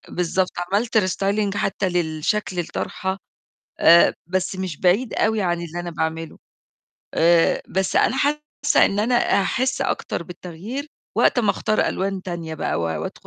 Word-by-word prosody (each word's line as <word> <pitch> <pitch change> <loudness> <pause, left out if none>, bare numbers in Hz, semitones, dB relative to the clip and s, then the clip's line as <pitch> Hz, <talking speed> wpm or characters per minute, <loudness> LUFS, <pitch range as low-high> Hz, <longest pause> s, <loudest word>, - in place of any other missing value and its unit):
بالضبط، 180 +1 +1
عملت 200 +6 0
restyling 200 +1 0
حتّى 190 -1 0
للشكل 175 +3 -1
الطرحة، 190 +3 -3 0.6
آآ 170 +1 +7
بس 185 +1 -1
مش 185 -5 -4
بعيد 200 +7 +2
أوي 220 -1 +1
عن 175 -2 0
اللي 170 0 -6
أنا 175 0 -4
باعمله. 160 0 -3 0.8
آآ 170 0 +4
بس 190 0 -1
أنا 260 - +3
حاسّة 295 0 +2
إن 200 - 0
أنا 235 +4 +1 0.3
هاحس 255 +7 0
أكتر - - -2
بالتغيير 180 - -7 0.3
وقت - - +3
ما 225 - +3
أختار 215 - 0
ألوان 195 0 -2
تانية 170 -3 -5
بقى - - -2
و - - -2
وأدخـُ 80 -1 -4
185 Hz, 145 wpm, -22 LUFS, 170-210 Hz, 0.8 s, آآ